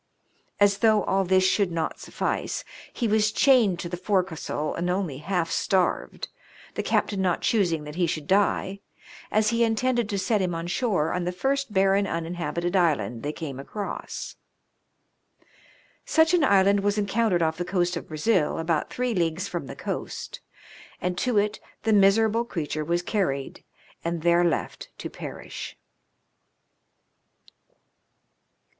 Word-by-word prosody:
As 200 -1 +4
though 215 -2 +4
all 195 0 +1
this 185 0 +3
should 190 0 +2
not 165 -1 -2
suffice, - - -3 0.3
he 235 - -1
was 215 0 +3
chained 235 -8 +4
to - - -4
the 175 - -4
fore 190 +1 +2
castle 160 -3 -4
and 175 +1 -2
only 180 -7 -1
half 175 +1 -1
starved, 190 - 0 0.5
the - - -2
captain 200 -2 0
not 180 -2 +1
choosing 175 -8 +1
that 150 0 -8
he 175 +1 +1
should 155 -2 -3
die, 195 +1 +1 0.5
as 215 0 +2
he 235 0 +2
intended 235 0 +1
to 200 - -1
set 195 +2 +1
him 180 -2 -1
on 165 0 -4
shore 180 -4 0
on 180 - -1
the 180 - 0
first 270 +7 -1
barren 195 0 +3
uninhabited 170 +1 -2
island 130 - +1
they 145 - -2
came 145 -4 -6
across. 200 +9 -6 1.7
Such 320 +1 +3
an 350 -4 +4
island 200 -4 +4
was 205 +1 0
encountered 200 -3 +1
off 160 0 0
the 175 - -1
coast 180 -1 0
of 170 - -6
Brazil, 155 +2 +1
about 165 -1 0
three 250 -1 -1
leagues 170 0 0
from 170 -7 -5
the - - -7
coast, - - -5 0.6
and 180 0 -1
to 250 -4 +1
it 210 +1 +1 0.2
the 220 0 +2
miserable 215 +3 +4
creature 155 -8 -3
was 170 +3 0
carried 175 -10 -2 0.4
and 170 -1 -2
there 170 0 +4
left 170 -2 -2
to - - -6
perish. - - -8
190 Hz, 150 wpm, -26 LUFS, 170-210 Hz, 1.7 s, As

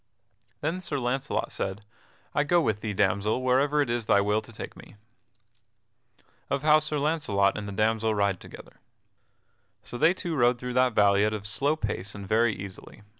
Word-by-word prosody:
Then 165 +5 -2
Sir 170 -5 -3
Launcelot 130 +3 -2
said: 100 +2 -4 0.5
"I 145 - +2
go 175 +4 +3
with 110 -10 0
thee, 110 - -3
damsel, 105 +4 +1
wherever 140 +4 +2
it 135 - -7
is 120 -2 -2
thy 100 - +5
will 105 +2 +1
to - - -13
take 110 - -8
me." - - -14 1.2
[Sidenote: - - -32 0.2
Of 140 - -1
how 155 0 +6
Sir 155 0 -3
Launcelot 140 -10 +1
and 105 -1 -5
the - - -5
damsel 110 +1 +1
ride 100 -3 +1
together] - - -13 1.1
So 120 - -8
they 170 +7 +4
two 170 -3 -3
rode 120 -2 +3
through 125 +1 -5
that 125 -1 +3
valley 100 -1 +4
at 110 0 +1
a 100 -1 -7
slow 135 +8 +1
pace 105 -7 -4
and 100 -1 -8
very 110 +1 +2
easily. 100 +2 -10
115 Hz, 185 wpm, -27 LUFS, 105-145 Hz, 1.2 s, how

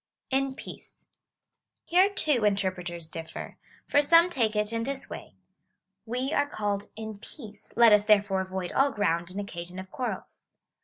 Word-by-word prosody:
^ - - -66 0.3
In 270 0 0
peace. - - -11 0.8
Here, 370 +3 +5
too, 295 - +1
interpreters 185 -5 -1
differ; 160 +1 -7 0.3
for 290 - +4
some 335 +4 +6
take 225 -8 +1
it 210 +1 +1
in 230 - 0
this 270 +3 -4
way - - -8 0.2
— - - -50
" - - -56
We 265 +4 -1
are 285 - +2
called 205 -6 -2
in 220 -1 -7
peace: 215 -3 -12
let 235 -2 +7
us 210 0 +5
therefore 205 -2 +4
avoid 185 -1 -4
all 275 +1 +3
ground 175 -7 0
and 190 +2 -5
occasion 180 -3 -7
of 185 0 -8
quarrels." 250 -2 -5
210 Hz, 170 wpm, -28 LUFS, 190-265 Hz, 0.8 s, let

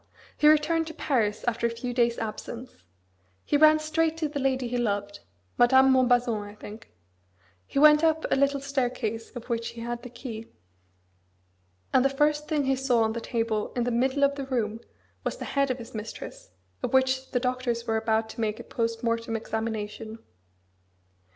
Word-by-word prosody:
he 300 - +3
returned 310 +2 +4
to 320 - -8
Paris 225 -10 0
after 235 0 +1
a - - -2
few 235 +2 -5
days' 235 -1 +2
absence. 230 +3 -6 0.7
He - - +1
ran 310 +1 +7
straight 315 +1 0
to 320 -2 -1
the 290 -1 -4
lady 260 -2 0
he 245 +1 -2
loved; 205 -3 -2 0.4
Madame 265 +2 +6
Montbazon, 245 -3 +3
I 205 0 -9
think: 215 +1 -11 0.8
he - - -6
went 300 +2 +7
up 320 -1 +2
a - - +5
little 280 +1 +2
staircase 250 -5 -2
of 245 - -8
which 230 -1 -2
he 235 - -9
had 240 0 -4
the 250 - -9
key, 230 -2 -8 1.5
and 255 - +5
the 275 - +4
first 295 +2 +1
thing 300 -3 +1
he 270 0 +2
saw 255 -3 +2
on 220 0 0
the 235 - -4
table 225 -3 -1
in 245 - +1
the 245 - -1
middle 260 +4 +1
of 280 0 +4
the 275 -1 -6
room 225 -4 -1 0.4
was - - -2
the - - -6
head 275 -1 +1
of 255 - -1
his 235 -2 -10
mistress, 220 - -8 0.3
of - - -3
which 260 0 +2
the 245 - 0
doctors 250 -2 -1
were 225 -1 0
about 220 0 +1
to 230 - -6
make 215 -1 -1
a - - -7
post 230 0 -3
mortem 230 -1 -1
examination." 220 0 -4
245 Hz, 185 wpm, -27 LUFS, 225-275 Hz, 1.5 s, ran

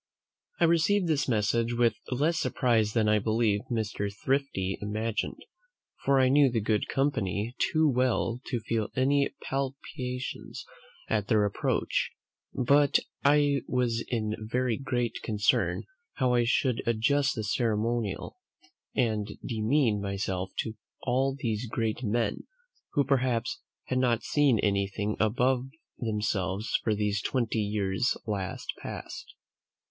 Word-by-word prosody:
I - - +3
received 170 +4 +3
this 145 -4 +1
message 115 0 +1
with 120 -1 +3 0.2
less 150 +6 +1
surprise 110 -4 +1
than 110 -2 +2
I 105 0 +4
believe 110 -1 +1
Mr. 105 -3 -2
Thrifty 100 -4 -1
imagined; 110 +2 -2 0.6
for 135 -1 +4
I 130 - +5
knew 140 +1 +5
the 120 -2 0
good 105 0 0
company 115 -5 0 0.2
too 155 -1 +4
well 125 -2 +1
to 120 -3 -2
feel 110 -1 -1
any 140 +2 +3 0.2
palpitations 135 -1 -4 0.4
at 105 -2 0
their 105 -3 +3
approach; 100 - 0 0.4
but 140 +3 +4 0.3
I 145 -1 +4
was 120 -2 0
in 110 -3 -1
very 120 +2 0
great 120 -3 -2
concern 105 -2 +1 0.3
how 130 -2 +1
I 120 -1 +3
should 125 0 +1
adjust 135 +5 +2
the 110 - -3
ceremonial, 115 - -1 0.6
and 110 -5 +1 0.2
demean 115 -1 +1
myself 95 -2 -2
to 110 - -5 0.3
all 135 +2 +1
these 115 -1 -2
great 115 0 -1
men, 115 -1 -1 0.5
who 145 - +3
perhaps 130 -4 0 0.2
had 130 - -1
not 120 -3 +2
seen 145 -5 +3
anything 100 +1 0
above 125 +4 +2 0.3
themselves 105 -1 -1
for 110 - +1
these 105 0 0
twenty 120 -4 0
years 100 +2 0
last 100 -4 -3
past. - - -8
115 Hz, 125 wpm, -28 LUFS, 105-130 Hz, 0.6 s, I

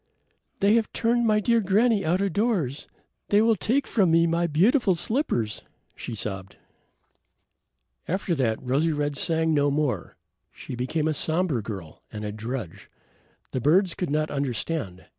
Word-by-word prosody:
"They 200 +2 +4
have 230 -1 +1
turned 235 0 +1
my 215 -1 +3
dear 230 +2 +2
granny 210 +2 +2
out 175 +4 +1
of 200 -3 -1
doors; 185 - -1 0.4
they 205 - +4
will 225 +1 +4
take 255 +8 0
from 195 -6 +2
me 165 +1 +4
my 170 +1 +1
beautiful 195 - +3
slippers," 165 - -1 0.3
she - - -6
sobbed. 95 -2 -5 1.5
After 190 0 -1
that, 120 -7 0
Rosy 145 +6 +1
red 145 -1 -1
sang 160 +2 +1
no 145 -1 +3
more. 140 - -2 0.3
She - - -9
became 130 +6 -1
a 155 - +1
somber 160 -3 0
girl 95 -7 -8
and 105 0 -6
a 105 - -3
drudge. 110 -3 -6 0.6
The 130 - -2
birds 175 - +3
could 180 - -3
not 155 +1 0
understand. 135 - -3
160 Hz, 155 wpm, -25 LUFS, 130-200 Hz, 1.5 s, They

